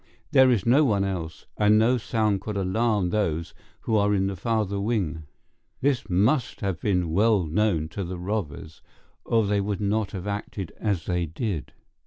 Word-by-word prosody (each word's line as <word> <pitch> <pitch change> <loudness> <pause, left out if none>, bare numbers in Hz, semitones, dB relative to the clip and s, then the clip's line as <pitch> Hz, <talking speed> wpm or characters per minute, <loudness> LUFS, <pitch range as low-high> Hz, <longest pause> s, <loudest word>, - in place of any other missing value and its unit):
There 130 -1 +6
is 115 -7 +1
no 130 +6 +5
one 105 -8 +2
else, 85 -5 -4
and 105 0 +4
no 120 +3 +3
sound 110 -4 0
could 105 0 -4
alarm 100 -1 +1
those 85 -6 -1 0.3
who 110 - -1
are 105 0 +3
in 95 -1 +1
the 95 0 -2
farther 100 0 -1
wing. 90 -9 -2 0.5
This 130 -6 0
must 115 +9 +1
have 95 -5 -2
been 90 -5 0
well 105 +2 +3
known 80 -1 +1
to 100 - -4
the 90 +1 -5
robbers, 85 -5 -4 0.4
or 115 -2 +2
they 100 0 +1
would 100 -1 -2
not 105 0 0
have 95 -2 -5
acted 100 -3 -4
as 100 -7 -1
they 90 -2 -1
did. 80 - -4
100 Hz, 175 wpm, -25 LUFS, 90-110 Hz, 0.5 s, There